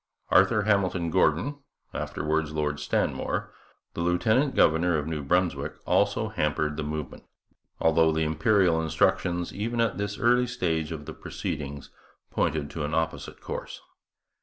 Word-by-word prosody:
Arthur 105 +3 +5
Hamilton 95 -5 +1
Gordon 95 - +2 0.3
(afterwards 75 +1 -2
Lord 75 -1 -1
Stanmore), - - -1 0.4
the - - -4
lieutenant 110 +11 +2
governor 80 +1 +4
of 75 - -2
New 80 -2 -3
Brunswick, 90 +5 0
also - - +2
hampered 75 0 -1
the 80 - -3
movement; 75 -2 -5 0.5
although 80 0 +4
the 80 0 0
Imperial 80 +2 +3
instructions, 85 +2 +1
even 115 +4 -3
at 115 -3 +1
this 100 0 -3
early 125 +1 +3
stage 80 -10 -1
of 75 -2 -6
the - - -7
proceedings, 70 -1 -5 0.4
pointed 75 -1 -1
to 80 - -4
an 75 +2 -2
opposite 80 0 -3
course. - - -6
80 Hz, 135 wpm, -27 LUFS, 75-100 Hz, 0.5 s, Arthur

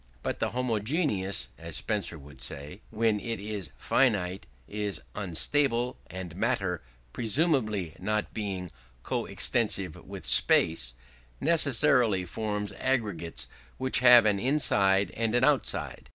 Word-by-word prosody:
But - - -3
the - - 0
homogeneous 115 - -1
(as 80 -1 -5
Spencer 100 -3 -1
would 70 -3 -14
say) 75 +8 -7
when 110 -1 +1
it 115 0 -4
is 100 -3 -5
finite 100 -8 +1 0.2
is 105 -5 -3
unstable: 120 - 0
and 90 -2 -8
matter, 95 -5 -1 0.3
presumably 110 - +1
not 105 +3 -2
being 95 -5 -4 0.3
co - - -2
extensive - - +1
with - - -9
space, 60 +1 +4 0.4
necessarily 125 - +3
forms 105 +2 -3
aggregates 100 - -1 0.3
which 130 0 +1
have 120 -2 +8
an 105 -2 +2
inside 100 -7 +2
and 115 0 -1
an 120 - +2
outside. 145 -1 0
105 Hz, 120 wpm, -28 LUFS, 90-120 Hz, 0.4 s, have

